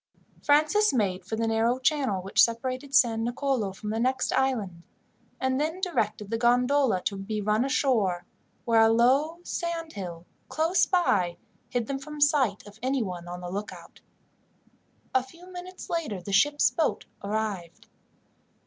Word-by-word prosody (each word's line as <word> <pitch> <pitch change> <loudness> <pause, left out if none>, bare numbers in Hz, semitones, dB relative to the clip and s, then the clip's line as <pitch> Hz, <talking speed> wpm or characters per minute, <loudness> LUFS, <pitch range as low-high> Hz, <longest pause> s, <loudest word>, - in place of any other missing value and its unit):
Francis 310 +9 +3
made 195 -7 0
for 205 +5 -4
the 225 +1 -1
narrow 225 +2 +1
channel 260 -8 0
which 200 +2 +3
separated 255 +4 -1
San 225 -3 +4
Nicolo 245 -3 -1
from 210 +2 -6
the 220 - -2
next 255 +2 0
island, 220 -10 0 0.6
and 260 +1 0
then 320 +4 -2
directed 215 - -2
the 225 - -1
gondola 245 -3 +3
to 200 - -1
be 210 +2 -4
run 210 +3 +1
ashore, 225 -10 +1 0.4
where 230 -1 +4
a 225 - +6
low 265 +8 +3
sand 335 -2 -4
hill, 175 -4 -7 0.2
close 325 +4 +2
by, 195 - +1 0.3
hid 245 -2 -1
them 270 +3 -3
from 300 +2 -9
the 290 -1 +5
sight 265 -9 +1
of 205 +1 -14
anyone 215 -10 -2
on 175 +1 -7
the 175 0 -6
lookout. 205 +2 -7 1.1
A 260 - +4
few 335 +8 -15
minutes 365 +1 -9
later 315 - -2
the 195 +3 -6
ship's 290 +9 +4
boat 320 - -1 0.2
arrived. 200 -5 -3
240 Hz, 155 wpm, -27 LUFS, 205-285 Hz, 1.1 s, a